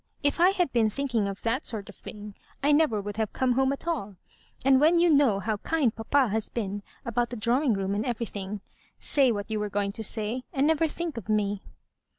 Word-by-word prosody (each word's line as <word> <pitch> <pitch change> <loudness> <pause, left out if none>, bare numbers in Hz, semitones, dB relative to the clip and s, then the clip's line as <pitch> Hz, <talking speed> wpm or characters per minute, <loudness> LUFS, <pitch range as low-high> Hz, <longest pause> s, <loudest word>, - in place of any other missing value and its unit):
If 285 +3 +1
I 355 +2 +7
had 360 -7 0
been 225 -3 +3
thinking 235 -4 -1
of 195 -1 -6
that 245 +5 0
sort 210 -4 -4
of 205 - -10
thing, 210 0 -10 0.3
I 290 - +4
never 290 -8 +3
would 205 +1 -6
have 220 -2 -1
come 260 -1 +1
home 265 +2 +2
at 280 +4 -6
all; 230 - -2 0.5
and 265 0 +5
when 325 +3 +5
you 340 0 +4
know 280 -9 +4
how 215 +2 -2
kind 280 -1 0
papa 250 +3 +2
has 220 +1 -2
been 205 -3 -3 0.2
about 235 +1 0
the 245 - -6
drawing 240 +4 +2
room 195 0 -1
and 205 +2 -1
everything. 210 -4 -4 0.4
Say 270 -4 +3
what 205 0 -4
you 215 - 0
were 210 0 -2
going 200 0 -1
to 220 - -6
say, 220 +4 0
and 270 +1 +1
never 320 +1 +3
think 330 -2 -5
of 220 -2 -7
me." 205 -2 0
230 Hz, 220 wpm, -27 LUFS, 210-280 Hz, 0.5 s, I